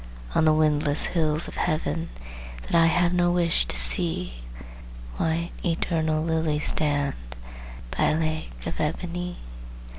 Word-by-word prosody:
On 160 - +3
the 155 - +5
windless 150 -1 +2
hills 155 -2 +1
of - - -9
Heaven, 85 - -1 0.5
That - - -9
I 165 -1 +5
have 175 +1 +2
no 175 -1 +2
wish 170 - +2
to 60 - -3
see, - - +3 0.8
White, 165 +1 -1
eternal 160 -2 0
lilies 160 -2 +1
stand, 145 -2 0 0.8
By - - +2
a 155 - +1
lake 155 -1 -4
of - - -5
ebony. 175 +3 -3
155 Hz, 130 wpm, -25 LUFS, 150-170 Hz, 0.8 s, the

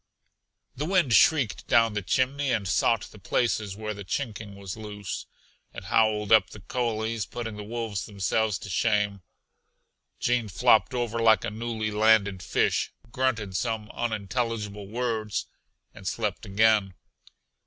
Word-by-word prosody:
The 145 - -3
wind 175 -10 +3
shrieked 115 - +4
down 115 -2 +4
the 105 - -1
chimney 130 +7 0
and 105 -5 0
sought 110 +4 +2
the 105 - -14
places 105 0 -1
where 105 0 -4
the 100 -1 -8
chinking 105 -1 -4
was 100 -2 -7
loose. 105 -3 -6 0.5
It - - -7
howled 105 -2 +2
up 110 -1 +6
the 105 - -11
coulees, 115 0 -2
putting 115 -3 -5
the 105 - -7
wolves 110 -3 -4
themselves 105 +1 0
to 100 - -9
shame. 105 -1 +1 1.0
Gene 120 -2 +1
flopped 110 +6 +3
over 120 -2 -1
like 110 -1 +4
a - - -3
newly 110 -1 -3
landed 105 -3 +3
fish, - - +1 0.2
grunted 115 -7 -1
some 110 +1 -2
unintelligible 110 -2 -3
words 110 -1 -2 0.5
and 95 -3 -9
slept 105 +1 -2
again. 105 -2 +3
110 Hz, 140 wpm, -27 LUFS, 105-115 Hz, 1.0 s, up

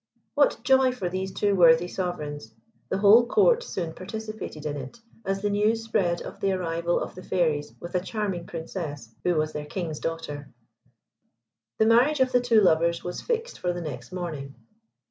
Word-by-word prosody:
What 285 -5 +2
joy 265 0 +4
for 200 -8 -3
these 190 +1 -3
two 205 +1 +1
worthy 170 -1 +6
sovereigns. 150 -11 -5 0.3
The 190 - 0
whole 215 +4 +6
Court 470 - +4
soon 175 - -4
participated 215 -5 -7
in 150 -1 -2
it, 135 - -8 0.3
as 195 +1 -1
the 205 - +2
news 215 +2 +1
spread 190 -7 0
of - - -9
the 195 -1 +1
arrival 170 -1 -1
of - - -5
the 185 - -10
Fairies 155 -6 -1
with 170 - -8
a 180 - +2
charming 195 -2 -3
Princess, 155 - -6
who 180 -1 +2
was 155 0 0
their 150 0 -5
King's 160 -2 -4
daughter. 150 -4 -5 1.3
The 220 - +4
marriage 250 +7 +4
of 260 -1 +3
the 250 -1 +4
two 235 -3 +4
lovers 170 -2 +3
was 180 - -5
fixed 470 0 -3
for 180 -1 -1
the 175 - -5
next 135 -5 -7
morning. 155 -7 -5
180 Hz, 180 wpm, -26 LUFS, 160-220 Hz, 1.3 s, worthy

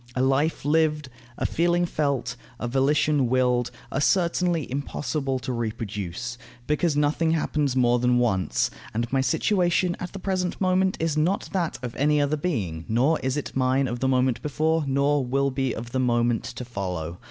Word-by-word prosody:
A 130 - +1
life 135 +3 +1
lived, 150 -2 +2 0.3
a - - -2
feeling 175 +1 +2
felt, 140 -7 -1 0.2
a 120 - -2
volition 140 +2 +2
willed, 125 -1 +2 0.2
are 135 - -1
certainly 170 -2 +2
impossible 135 0 -2
to 130 0 -4
reproduce, 115 0 -4 0.3
because 150 +1 +1
nothing 150 +3 +2
happens 150 -4 0
more 120 -1 +3
than 125 0 +3
once, 95 - +1 0.2
and 120 +3 -2
my 135 - +3
situation 175 - +1
at 180 - -5
the - - -7
present 185 -2 -2
moment 185 0 +2
is 160 -2 0
not 175 +6 0
that 175 -4 -1
of 120 -2 -5
any 150 +2 +3
other 145 +1 +1
being, 110 - -2
nor 130 +8 +2
is 130 +2 -1
it 145 - -5
mine 130 +1 +2
of 120 -1 -4
the 130 - +1
moment 130 -2 +2
before, 155 +2 0
nor 140 +1 +2
will 135 +2 0
be 130 -1 -1
of 115 +1 -6
the 130 - -1
moment 120 -2 +1
to 125 0 -6
follow. 90 -7 -4
135 Hz, 175 wpm, -25 LUFS, 120-155 Hz, 0.3 s, more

